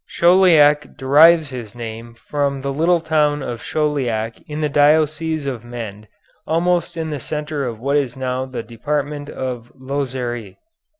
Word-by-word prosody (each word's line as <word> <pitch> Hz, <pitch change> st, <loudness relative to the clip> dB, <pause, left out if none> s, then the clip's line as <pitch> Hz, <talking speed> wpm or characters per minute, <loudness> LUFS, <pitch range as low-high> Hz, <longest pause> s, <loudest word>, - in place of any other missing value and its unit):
Chauliac 165 Hz, -6 st, +4 dB
derives 155 Hz, +2 st, +5 dB
his 120 Hz, -3 st, -7 dB
name 115 Hz, 0 st, -7 dB
from 140 Hz, +1 st, -2 dB
the 140 Hz, 0 st, -3 dB
little 170 Hz, +4 st, +3 dB
town 150 Hz, -2 st, +1 dB
of 120 Hz, -1 st, -5 dB
Chauliac 125 Hz, -8 st, -1 dB
in 150 Hz, +1 st, -4 dB
the 150 Hz, -, +2 dB
diocese 155 Hz, +1 st, +2 dB
of 125 Hz, -4 st, -4 dB
Mende, 110 Hz, -3 st, -8 dB, 0.4 s
almost 170 Hz, +1 st, 0 dB
in 160 Hz, -1 st, -3 dB
the 145 Hz, -, -3 dB
centre 150 Hz, 0 st, -3 dB
of 115 Hz, -3 st, -6 dB
what 140 Hz, +4 st, +1 dB
is 130 Hz, -3 st, -1 dB
now 130 Hz, 0 st, -2 dB
the 130 Hz, -3 st, -5 dB
department 145 Hz, +5 st, -3 dB
of 125 Hz, -2 st, -5 dB
Lozère. 130 Hz, -5 st, -4 dB
140 Hz, 145 wpm, -20 LUFS, 120-155 Hz, 0.4 s, derives